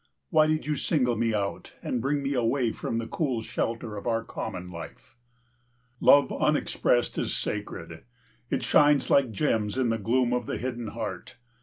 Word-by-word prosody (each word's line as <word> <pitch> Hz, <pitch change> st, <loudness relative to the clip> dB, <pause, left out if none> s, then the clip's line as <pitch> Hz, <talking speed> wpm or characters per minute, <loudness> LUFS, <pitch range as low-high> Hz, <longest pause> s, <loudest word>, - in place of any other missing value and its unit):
Why 155 Hz, 0 st, +5 dB
did 155 Hz, 0 st, 0 dB
you 150 Hz, -1 st, -1 dB
single 125 Hz, -7 st, +1 dB
me 115 Hz, +1 st, +1 dB
out 100 Hz, -2 st, -3 dB
and 125 Hz, -, -1 dB
bring 140 Hz, +2 st, 0 dB
me 140 Hz, +1 st, -1 dB
away 120 Hz, -1 st, +1 dB
from 115 Hz, -, -3 dB
the 115 Hz, -, -2 dB
cool 130 Hz, -4 st, -2 dB
shelter 115 Hz, -1 st, -3 dB
of 100 Hz, -, -6 dB
our 115 Hz, -1 st, +1 dB
common 90 Hz, -4 st, -6 dB
life? 85 Hz, +6 st, -10 dB, 0.8 s
Love 145 Hz, 0 st, +6 dB
unexpressed 145 Hz, -4 st, +1 dB
in -, -, 0 dB
sacred. -, -, -4 dB, 0.5 s
It -, -, -1 dB
shines 145 Hz, -2 st, +4 dB
like 140 Hz, -3 st, +5 dB
gems 110 Hz, -2 st, 0 dB
in 130 Hz, -3 st, +2 dB
the 115 Hz, 0 st, 0 dB
gloom 120 Hz, +3 st, +1 dB
of 125 Hz, -2 st, -1 dB
the -, -, -2 dB
hidden 120 Hz, -2 st, -4 dB
heart. 105 Hz, -1 st, -6 dB
120 Hz, 170 wpm, -27 LUFS, 110-140 Hz, 0.8 s, Love